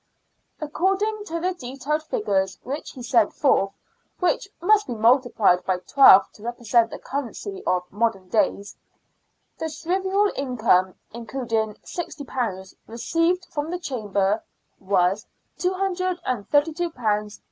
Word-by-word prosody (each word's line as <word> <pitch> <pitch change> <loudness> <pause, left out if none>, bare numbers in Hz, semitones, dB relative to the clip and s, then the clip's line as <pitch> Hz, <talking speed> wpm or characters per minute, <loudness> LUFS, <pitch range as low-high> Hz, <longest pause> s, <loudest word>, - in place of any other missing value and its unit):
According 390 +7 -1
to 335 -3 -3
the 365 +2 0
detailed 275 +1 -3
figures 200 - -1
which 280 +5 -5
he 255 - -9
set 235 -3 +3
forth 195 -8 +2 0.5
(which 360 +1 +1
must 420 +3 +3
be 240 - -3
multiplied 225 -5 +3
by 185 0 0
twelve 195 +1 +7
to - - -18
represent 235 0 +1
the - - -7
currency 285 - -5
of 180 -1 +2
modem 200 -3 -1
days), 200 0 0 0.8
the 320 - -2
shrieval 380 +6 0
income, 220 -9 +2 0.2
including 230 -2 -2
£60 250 - -4
received 330 +10 0
from 295 +1 -3
the 355 - -2
Chamber, 210 - -1 0.4
was 190 +1 +1 0.3
£232 350 - 0
los. 210 -3 -1
255 Hz, 115 wpm, -24 LUFS, 210-345 Hz, 0.8 s, twelve